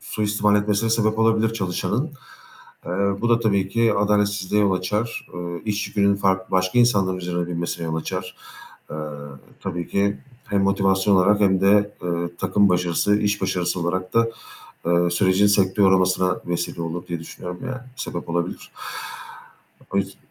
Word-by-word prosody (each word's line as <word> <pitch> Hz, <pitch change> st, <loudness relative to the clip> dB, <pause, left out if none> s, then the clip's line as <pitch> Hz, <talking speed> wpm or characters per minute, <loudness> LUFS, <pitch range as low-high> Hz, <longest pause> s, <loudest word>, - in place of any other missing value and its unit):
suistimal 105 Hz, -5 st, +1 dB
etmesine 105 Hz, +2 st, +1 dB
sebep 110 Hz, -1 st, +1 dB
olabilir 110 Hz, 0 st, +3 dB
çalışanın. 110 Hz, -, -2 dB, 0.8 s
Eee, 85 Hz, -, -3 dB, 0.3 s
bu 120 Hz, -, +1 dB
da 115 Hz, 0 st, +3 dB
tabii 100 Hz, -4 st, +1 dB
ki 115 Hz, +1 st, +2 dB
adaletsizliğe 105 Hz, 0 st, +1 dB
yol 100 Hz, -2 st, +3 dB
açar. 105 Hz, +5 st, -2 dB
Iıı, 85 Hz, -1 st, -5 dB
iş 105 Hz, 0 st, -2 dB
yükünün 100 Hz, -1 st, +2 dB
fark 95 Hz, -1 st, 0 dB
başka 95 Hz, +5 st, +1 dB
insanlar 100 Hz, -6 st, +3 dB
üzerine 90 Hz, -1 st, -3 dB
binmesine 85 Hz, 0 st, -3 dB
yol 80 Hz, 0 st, -2 dB
açar. 90 Hz, +3 st, -4 dB, 0.5 s
Eee, -, -, -5 dB, 0.7 s
tabii 90 Hz, -3 st, -4 dB
ki 100 Hz, +1 st, 0 dB, 0.3 s
hem 100 Hz, -1 st, 0 dB
motivasyon 95 Hz, 0 st, +2 dB
olarak 100 Hz, +3 st, +4 dB
hem 95 Hz, -2 st, +3 dB
de, 100 Hz, +1 st, +3 dB
eee, 90 Hz, -, -2 dB, 0.3 s
takım 100 Hz, +2 st, +3 dB
başarısı, 90 Hz, +2 st, +2 dB
iş 105 Hz, 0 st, 0 dB
başarısı 90 Hz, 0 st, -1 dB
olarak 90 Hz, +2 st, -2 dB
da, 115 Hz, 0 st, +4 dB, 0.6 s
eee, 85 Hz, 0 st, +3 dB
sürecin 95 Hz, +2 st, +3 dB
sekteye 100 Hz, -1 st, +3 dB
uğramasına 95 Hz, -1 st, +2 dB
vesile 85 Hz, -1 st, -3 dB
olur 85 Hz, +2 st, -5 dB
diye 85 Hz, -2 st, -4 dB
düşünüyorum, 90 Hz, +2 st, -8 dB
yani 130 Hz, 0 st, -4 dB, 0.2 s
sebep 85 Hz, -, -5 dB
olabilir. 85 Hz, +1 st, -3 dB, 1.2 s
O -, -, -2 dB
yüz 100 Hz, 0 st, -1 dB
95 Hz, 150 wpm, -22 LUFS, 90-105 Hz, 1.2 s, olarak